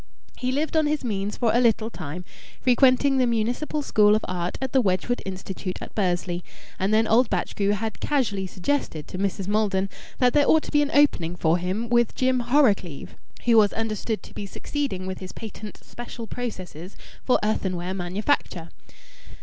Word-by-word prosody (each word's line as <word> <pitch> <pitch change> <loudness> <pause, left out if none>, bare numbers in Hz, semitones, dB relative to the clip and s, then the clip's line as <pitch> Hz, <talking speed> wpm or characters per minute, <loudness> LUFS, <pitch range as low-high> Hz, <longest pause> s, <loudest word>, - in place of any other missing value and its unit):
He 255 0 -2
lived 305 +5 -1
on 310 -1 +3
his 300 -1 -1
means 205 -3 -2
for 235 -3 +2
a 240 - +4
little 230 -2 +2
time, 180 -1 -7 0.3
frequenting 265 +2 +4
the 255 -1 +3
Municipal 245 +7 -1
School 210 -5 +4
of 215 - -1
Art 180 -1 -3
at 265 -1 -3
the 265 - +5
Wedgwood 200 +4 0
Institution 190 0 -5
at - - -9
Bursley, 180 -3 -1 0.4
and 190 +2 +1
then 220 +1 +4
old 225 +2 +4
Batchgrew 200 +2 0
had 220 +2 -3
casually 215 -10 0
suggested 185 - -2
to 185 - -7
Mrs. 195 -1 -1
Maldon 200 -2 +1 0.3
that 250 -1 +3
there 290 -1 +4
ought 315 - +5
to - - -7
be 295 - +4
an 290 - 0
opening 180 - +3
for 170 0 +2
him 190 +6 -2
with 240 -1 +2
Jim 255 0 +2
Horrocleave, 235 - +1 0.3
who 235 -2 +5
was 210 -2 +5
understood 220 0 -2
to - - -13
be 200 - -6
succeeding 225 -3 -3
with 185 -1 -5
his 185 -1 -8
patent 215 -1 -8
special 240 -1 -8
processes 190 -7 -6 0.3
for 255 - +3
earthenware 185 -4 -1
manufacture. 180 - -1
215 Hz, 175 wpm, -25 LUFS, 185-250 Hz, 0.4 s, the